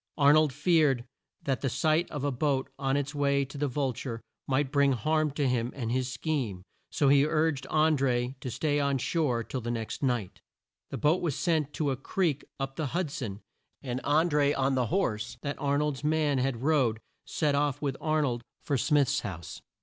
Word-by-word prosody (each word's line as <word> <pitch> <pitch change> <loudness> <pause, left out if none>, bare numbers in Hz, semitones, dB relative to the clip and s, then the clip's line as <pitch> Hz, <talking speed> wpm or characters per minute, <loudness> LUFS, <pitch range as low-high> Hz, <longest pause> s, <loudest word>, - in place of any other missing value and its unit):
Ar 145 0 +6
nold 155 -1 +4
feared 150 -4 +2 0.4
that 135 -2 -1
the 135 - 0
sight 155 +6 +1
of 145 -3 -5
a 145 - +1
boat 135 0 0
on 135 0 +1
its 145 +1 -2
way 140 -1 +1
to 135 - -13
the 145 +1 0
Vul 135 0 -1
ture 115 -1 -5 0.3
might 135 0 +1
bring 140 -1 +4
harm 155 +6 +1
to 145 -2 0
him 120 -1 0
and 120 -4 -3
his 130 0 -1
scheme, 120 - -2 0.3
so 145 - +1
he 140 0 +6
urged 155 -3 0
An 155 0 +3
dré 125 -2 0
to 130 - -5
stay 145 +5 0
on 140 -1 +1
shore 130 -4 0
till 130 +2 -5
the 120 - -4
next 115 -2 -4
night. 120 -8 -1 0.5
The - - -4
boat 155 +4 +2
was 160 -6 -1
sent 160 -5 +1
to 145 -3 0
a 130 - -2
creek 150 +1 -1 0.2
up 135 0 -4
the 155 -3 -1
Hud 175 -6 -1
son, 110 -7 -5 0.4
and 130 -1 -3
An 155 +4 +3
dré 145 -2 +2
on 135 0 +2
the 125 -2 +1
horse 120 - -1
that 145 -1 -4
Ar 140 0 +1
nold's 150 -2 -1
man 150 -2 +2
had 130 -2 -1
rode, 135 -8 +2 0.3
set 150 -2 0
off 145 -1 +1
with 140 -3 -2
Ar 155 -1 +1
nold 120 -4 -1 0.2
for 140 -4 0
Smith's 145 +1 +2
house. 90 - -7
140 Hz, 205 wpm, -29 LUFS, 130-150 Hz, 0.5 s, Ar